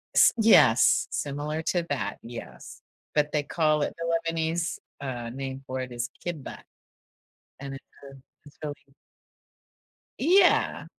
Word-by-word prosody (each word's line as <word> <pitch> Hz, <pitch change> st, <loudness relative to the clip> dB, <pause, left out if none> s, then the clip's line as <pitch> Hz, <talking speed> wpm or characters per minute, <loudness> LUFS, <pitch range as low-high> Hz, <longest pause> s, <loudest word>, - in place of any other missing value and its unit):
S -, -, +7 dB
yes, 150 Hz, -, +5 dB
similar 150 Hz, +2 st, -3 dB
to 175 Hz, -1 st, +1 dB
that, 140 Hz, -5 st, -2 dB
yes, 115 Hz, -, -10 dB, 0.3 s
but, 150 Hz, 0 st, +1 dB
they 150 Hz, -1 st, +1 dB
call 155 Hz, 0 st, +1 dB
it -, -, -1 dB
the 165 Hz, 0 st, -1 dB
Lebanese, 165 Hz, +1 st, -1 dB, 0.2 s
uh, 120 Hz, -4 st, -4 dB
name 135 Hz, +2 st, -6 dB
for 130 Hz, 0 st, -3 dB
it 125 Hz, -, -6 dB
is 120 Hz, 0 st, -3 dB, 0.2 s
"كِبّة", 165 Hz, -6 st, -5 dB, 1.0 s
and 140 Hz, -1 st, -6 dB
it's, 135 Hz, -, -10 dB, 0.3 s
um, 135 Hz, -1 st, -15 dB, 0.2 s
it's 145 Hz, -, -16 dB
really 145 Hz, -1 st, -3 dB, 1.4 s
Yeah. 360 Hz, +5 st, +4 dB
145 Hz, 130 wpm, -27 LUFS, 130-165 Hz, 1.4 s, S